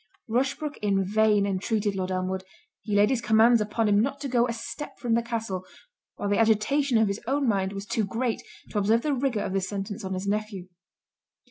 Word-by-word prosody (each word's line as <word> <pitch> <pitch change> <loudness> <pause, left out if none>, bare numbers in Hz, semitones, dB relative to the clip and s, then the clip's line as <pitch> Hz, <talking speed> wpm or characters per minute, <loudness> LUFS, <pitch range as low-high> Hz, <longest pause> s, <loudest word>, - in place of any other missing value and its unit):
Rushbrook 270 +5 -1
in 195 -2 +1
vain 210 0 +3
entreated 200 +1 -1
Lord 185 -1 -2
Elmwood; 185 0 -2 0.4
he 210 -2 -2
laid 205 +3 +4
his 250 -3 0
commands 225 +1 +5
upon 210 +1 0
him 205 0 +4
not 275 +4 -1
to 285 - -2
go 245 -2 +2
a - - -2
step 235 +5 -7
from 240 -2 -1
the 235 - +3
Castle; 225 -5 -3 0.5
while 205 - -3
the 205 +1 +1
agitation 230 +4 +3
of 220 -1 +4
his 200 +2 -3
own 275 +1 +1
mind, 195 -3 +1
was 200 0 -6
too 225 0 0
great, 230 +4 -2 0.3
to 210 - 0
observe 220 +3 +2
the 300 - +1
rigour 255 -5 0
of - - -3
this 190 -1 -1
sentence 200 0 -5
on 190 0 -3
his 185 +1 -4
nephew. 200 -2 -3
215 Hz, 210 wpm, -26 LUFS, 200-235 Hz, 0.5 s, commands